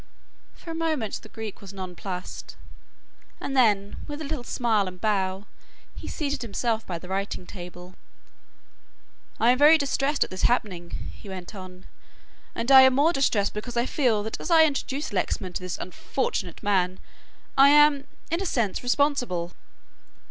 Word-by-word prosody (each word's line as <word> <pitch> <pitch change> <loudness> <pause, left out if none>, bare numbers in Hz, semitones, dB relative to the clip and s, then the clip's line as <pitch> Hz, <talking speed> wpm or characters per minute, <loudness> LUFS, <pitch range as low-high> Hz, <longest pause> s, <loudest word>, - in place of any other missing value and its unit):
For 335 - -9
a - - -4
moment 315 -9 -2
the 220 - -14
Greek 220 -2 -7
was 200 -1 -10
nonplussed 185 -1 -7 0.8
and 275 - -4
then, 205 -6 +3
with 295 0 -6
a - - -5
little 295 -3 -4
smile 225 -5 +1
and 180 0 -8
bow, 195 -2 0 0.5
he - - -9
seated 285 -2 -3
himself 230 0 -1
by 175 - -3
the 180 - -11
writing 190 -1 -3
table. 180 -1 -10 1.5
"I 235 +2 +5
am 255 - +1
very 305 +3 +8
distressed 280 0 +1
at - - -9
this 185 - -5
happening," 185 -8 -1
he 205 - -12
went 185 +1 -7
on, 185 -2 -10 0.7
"and 235 +4 -1
I 265 -1 +11
am 260 -1 +6
more 305 +5 +4
distressed 225 -9 +1
because 235 +3 -5
I 235 - +2
feel 240 -8 +1
that 220 - -5
as - - -5
I 325 -2 +7
introduced 285 -2 -2
Lexman 185 -1 -2
to - - -4
this 180 -1 -4
unfortunate 185 -1 -3
man, 185 -3 +1 0.6
I 275 +1 +7
am 295 -1 +5 0.2
in 335 +3 0
a - - -2
sense 230 - 0
responsible." 245 - 0
220 Hz, 165 wpm, -26 LUFS, 185-275 Hz, 1.5 s, I